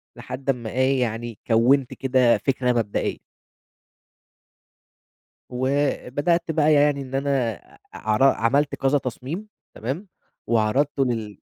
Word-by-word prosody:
لحد 130 +2 -7
أما 120 -4 -1
إيه 130 +1 +2
يعني 115 -1 -3
كَوِّنت 125 +3 +3
كده 130 -3 +3
فكرة 125 +3 0
مبدئية. 115 -4 -2 2.3
وبدأت 140 +5 0
بقى 155 -1 +3
يعني 145 -1 +3
إن 135 0 -9
أنا 135 -5 0 0.3
ع 110 - -5
عر 105 - +2
عملت 135 +2 +3
كذا 135 +2 +2
تصميم 140 - -6 0.3
تمام، 140 - -5 0.4
وعرضته 125 +6 +1
لل 110 -5 -3
130 Hz, 110 wpm, -23 LUFS, 120-140 Hz, 2.3 s, كَوِّنت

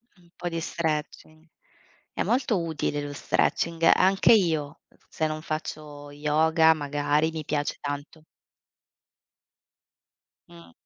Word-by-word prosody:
Un 175 -2 -24
po' 175 - -5
di 165 0 -3
stretching. 155 0 -4 0.7
È - - -3
molto 240 -7 +1
utile 150 -2 -2
lo 145 0 -6
stretching, 165 +3 +1
anche 195 +4 +5
io, 160 -8 +1 0.3
se 155 - -1
non 155 0 -4
faccio 150 -2 -6
yoga 160 +2 +3
magari, 150 +1 0
mi 160 -1 -5
piace 145 -1 -2
tanto. 145 +2 -6 2.3
Mh. 85 -1 -15
155 Hz, 110 wpm, -26 LUFS, 145-165 Hz, 2.3 s, anche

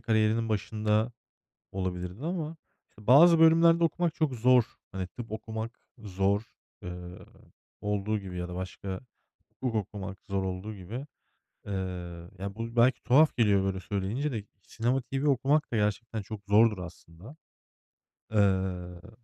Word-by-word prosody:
kariyerinin 110 0 +2
başında 110 +2 0 0.6
olabilirdi 90 - -4
ama, 165 -2 -3 0.3
işte, 105 0 -17
bazı 165 +7 +8
bölümlerde 165 +1 +6
okumak 165 0 +1
çok 150 -5 0
zor. 125 0 +5 0.3
Hani, 95 -1 -3
tıp 115 +2 -9
okumak 110 +1 -5 0.2
zor, 100 0 0 0.4
eee, 90 - -5 0.9
olduğu 105 +1 -1
gibi 95 -2 -7
ya 90 0 -3
da 90 - -6
başka 95 +1 -5 0.6
hukuk 125 -3 -1
okumak 100 -1 -4
zor 95 -1 0
olduğu 95 +3 -4
gibi. 115 +10 -7 0.6
Eee, - - -4 0.7
ya, 100 +1 -5
bu 115 +1 -5
belki 120 +2 +4
tuhaf 150 +5 +5
geliyor 100 -4 +4
böyle 95 -1 -1
söyleyince 100 - -2
de 110 -4 -3 0.2
Sinema 120 +6 -1
TV 135 +4 -2
okumak 140 +3 +2
da - - -1
gerçekten 105 +1 -1
çok 105 +1 -8
zordur 105 0 +5
aslında. 90 - -11 1.0
Eee 95 -2 0
110 Hz, 135 wpm, -29 LUFS, 95-125 Hz, 1.0 s, bazı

